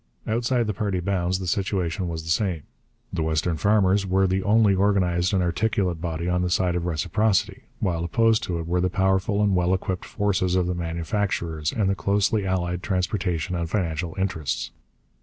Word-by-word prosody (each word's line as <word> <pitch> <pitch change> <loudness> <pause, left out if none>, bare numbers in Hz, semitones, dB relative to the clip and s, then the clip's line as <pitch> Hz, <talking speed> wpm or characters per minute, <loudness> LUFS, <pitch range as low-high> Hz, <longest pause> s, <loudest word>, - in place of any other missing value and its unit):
Outside 120 +2 +1
the 105 - -1
party 100 -1 -1
bounds 90 0 0
the 95 - -5
situation 95 -1 -1
was 80 -1 -4
the 80 - -3
same. 85 -4 0 0.5
The - - -1
western 80 +2 0
farmers 100 0 +3
were 95 0 +2
the 95 +1 +1
only 105 0 +4
organized 95 -3 +2
and 95 -3 +2
articulate 90 -2 0
body 85 0 -3
on 90 0 +1
the 90 - 0
side 90 0 +1
of 90 0 -2
reciprocity, 90 +6 0
while 85 -3 -1
opposed 110 +6 +2
to 85 - -2
it 85 - -4
were 90 +2 0
the 90 - +1
powerful 95 +2 +1
and 100 -2 +2
well 90 +1 +2
equipped 95 0 -3
forces 95 -3 0
of 90 -1 +2
the 90 - -1
manufacturers 85 -2 -2
and 105 -4 0
the 95 - +2
closely 100 +1 +1
allied 90 -1 -1
transportation 90 -3 -1
and 85 -1 -2
financial 85 -2 -2
interests. 90 -7 -2
90 Hz, 180 wpm, -24 LUFS, 85-100 Hz, 0.5 s, only